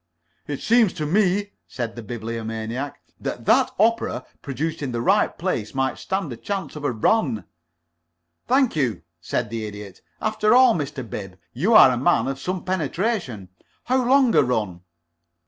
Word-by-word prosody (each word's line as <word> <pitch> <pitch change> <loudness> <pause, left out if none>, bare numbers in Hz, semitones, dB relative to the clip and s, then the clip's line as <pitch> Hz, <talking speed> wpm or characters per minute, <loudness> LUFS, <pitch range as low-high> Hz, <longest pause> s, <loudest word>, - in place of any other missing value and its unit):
"It 145 -2 -4
seems 230 -4 +4
to 155 - -3
me," 200 +4 +1 0.2
said 120 -3 -5
the 120 - -6
Bibliomaniac, 115 +3 -5 0.2
"that - - -5
that - - +4
opera 230 +3 +1 0.2
produced 155 +4 -3
in 135 -4 -3
the 120 - -1
right 115 - +2
place 105 +5 -3
might 135 0 -1
stand 190 -8 -3
a - - -9
chance 195 -8 -4
of 150 - -7
a 145 - +1
run." 120 - +1 1.0
"Thank 260 -3 +3
you," 125 - -1 0.2
said 110 +5 -2
the 115 -1 -3
Idiot. 105 -3 -8 0.2
"After 215 +1 +2
all, 255 -2 +7
Mr. 140 -5 -4
Bib, 95 -4 -7 0.2
you 190 - +2
are 130 - +9
a 125 - -1
man 120 -1 +2
of 135 0 -3
some 185 +3 -4
penetration. 175 - -2 0.3
How 255 +1 +1
long 260 -1 +4
a - - +6
run?" 110 -9 -1
140 Hz, 165 wpm, -23 LUFS, -, 1.0 s, are